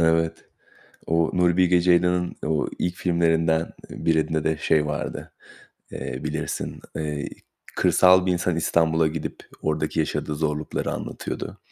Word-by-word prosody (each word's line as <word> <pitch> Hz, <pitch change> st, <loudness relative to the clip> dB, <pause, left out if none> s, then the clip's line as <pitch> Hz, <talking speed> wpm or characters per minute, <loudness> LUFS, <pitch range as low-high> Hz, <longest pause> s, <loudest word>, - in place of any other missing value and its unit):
Evet. 80 Hz, 0 st, +2 dB, 0.6 s
O 80 Hz, 0 st, +2 dB
Nuri 90 Hz, -1 st, +3 dB
Bilge 90 Hz, -1 st, +4 dB
Ceylan'ın 90 Hz, 0 st, +2 dB
o 75 Hz, -1 st, 0 dB
ilk 90 Hz, 0 st, -1 dB
filmlerinden, 80 Hz, -2 st, +1 dB, 0.2 s
eee, -, -, -8 dB
birinde 80 Hz, -1 st, +1 dB
de 80 Hz, 0 st, +1 dB
şey 75 Hz, -1 st, +2 dB
vardı, 75 Hz, 0 st, -4 dB, 0.6 s
eee, -, -, -5 dB
bilirsin, -, -, -3 dB, 0.2 s
eee, 75 Hz, -2 st, -3 dB, 0.5 s
kırsal 90 Hz, 0 st, +5 dB
bir 95 Hz, -, +2 dB
insan 90 Hz, -1 st, 0 dB
İstanbul'a 80 Hz, -1 st, +2 dB
gidip 80 Hz, 0 st, -5 dB, 0.2 s
oradaki 75 Hz, 0 st, -1 dB
yaşadığı 75 Hz, -1 st, -1 dB
zorlukları 75 Hz, 0 st, -2 dB
anlatıyordu. -, -, -5 dB
80 Hz, 130 wpm, -24 LUFS, 80-85 Hz, 0.6 s, kırsal